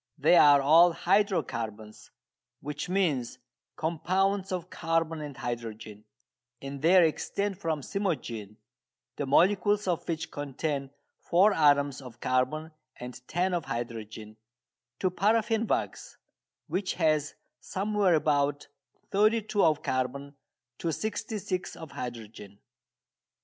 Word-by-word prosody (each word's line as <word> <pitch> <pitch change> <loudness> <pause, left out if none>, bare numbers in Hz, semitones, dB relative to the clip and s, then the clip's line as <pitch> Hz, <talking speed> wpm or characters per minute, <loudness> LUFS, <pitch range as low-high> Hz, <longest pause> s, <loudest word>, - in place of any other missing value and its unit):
They 155 +4 +4
are 145 -4 +7
all 165 +4 +6
"hydro 195 -1 +2
carbons," 110 -3 -7 0.5
which 150 +4 -5
means 155 -11 0 0.4
compounds 190 +4 0
of 180 -1 -4
carbon 165 -1 -1
and 145 -3 -7
hydrogen, 110 -3 -6 0.5
and 135 0 -7
they 175 +2 +6
extend 200 +4 -3
from 160 -5 -2
cymogene 125 - -3 0.6
(the 145 - -3
molecules 200 +7 +3
of 175 -3 -1
which 160 -2 -3
contain 145 0 -3 0.3
four 190 +5 +4
atoms 145 -3 +3
of 125 -3 -12
carbon 130 +6 0 0.2
and 125 0 -9
ten 180 +2 0
of 175 -2 -1
hydrogen) 110 -2 -6 0.6
to 185 - +1
paraffin 220 +4 +1
wax, - - -3 0.5
which 185 +4 -2
has 155 -3 +1 0.2
somewhere 200 -2 +1
about 145 -2 0 0.4
thirty 215 +2 +3
two 205 -1 0
of 155 -2 +2
carbon 130 +2 -2 0.5
to 165 - -1
sixty 220 +4 -3
six 185 -2 -4
of 160 -2 -10
hydrogen. 110 -4 -8
155 Hz, 120 wpm, -28 LUFS, 130-185 Hz, 0.6 s, are